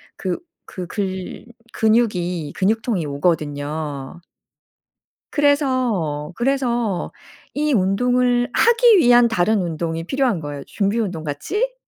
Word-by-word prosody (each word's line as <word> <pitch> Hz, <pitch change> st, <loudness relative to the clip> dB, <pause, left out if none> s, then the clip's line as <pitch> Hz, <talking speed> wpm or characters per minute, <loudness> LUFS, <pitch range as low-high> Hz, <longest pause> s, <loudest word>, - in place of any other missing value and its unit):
그 185 Hz, -2 st, -3 dB, 0.3 s
그 180 Hz, -2 st, -7 dB
글 190 Hz, 0 st, -4 dB, 0.3 s
근육이 180 Hz, -9 st, +1 dB
근육통이 215 Hz, -3 st, 0 dB
오거든요. 145 Hz, 0 st, -2 dB, 1.1 s
그래서, 255 Hz, -, +1 dB
그래서 240 Hz, -6 st, -1 dB, 0.4 s
이 295 Hz, 0 st, 0 dB
운동을 245 Hz, +5 st, +2 dB
하기 470 Hz, -2 st, +5 dB
위한 245 Hz, -5 st, +6 dB
다른 215 Hz, 0 st, +1 dB
운동이 165 Hz, -1 st, -3 dB
필요한 255 Hz, -5 st, 0 dB
거예요 145 Hz, -2 st, -6 dB
준비 205 Hz, +2 st, -1 dB
운동 180 Hz, -7 st, -3 dB
같이. 405 Hz, -, -2 dB
200 Hz, 225 characters per minute, -21 LUFS, 165-245 Hz, 1.1 s, 위한